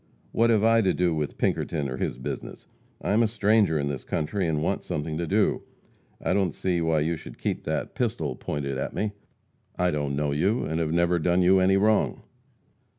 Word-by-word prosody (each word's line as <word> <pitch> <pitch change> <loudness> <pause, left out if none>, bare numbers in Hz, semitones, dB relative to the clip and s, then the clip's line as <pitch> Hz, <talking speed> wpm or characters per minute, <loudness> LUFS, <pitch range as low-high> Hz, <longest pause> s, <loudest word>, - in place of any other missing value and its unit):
What 115 +1 +3
have 110 -2 +3
I 115 0 +5
to 95 -3 +1
do 90 -2 +2
with 75 -2 -3
Pinkerton 75 -4 -1
or 65 -1 -4
his - - -2
business? 65 - -6 0.4
I - - 0
am 110 +3 +4
a 115 - +4
stranger 105 -5 +2
in 70 -1 -1
the 70 -2 -3
country 85 +8 -2
and 75 -2 0
want - - -1
something 75 +1 -3
to 85 - -2
do. - - +2 0.6
I - - 0
don't 95 -4 +1
see 90 -2 0
why 80 -2 +2
you 80 +3 0
should - - -11
keep - - -3
that - - -2
pistol 105 - -2
pointed 70 0 -3
at - - -4
me. 105 -1 -1 0.7
I 90 0 +2
don't 75 -2 -2
know 75 0 0
you, 95 +11 +1
and 80 +1 -2
have 80 -2 0
never 85 +1 +2
done 90 +3 +2
you 95 +2 +5
any 95 +1 +4
wrong." 105 +2 +2
85 Hz, 210 wpm, -26 LUFS, 75-100 Hz, 0.7 s, I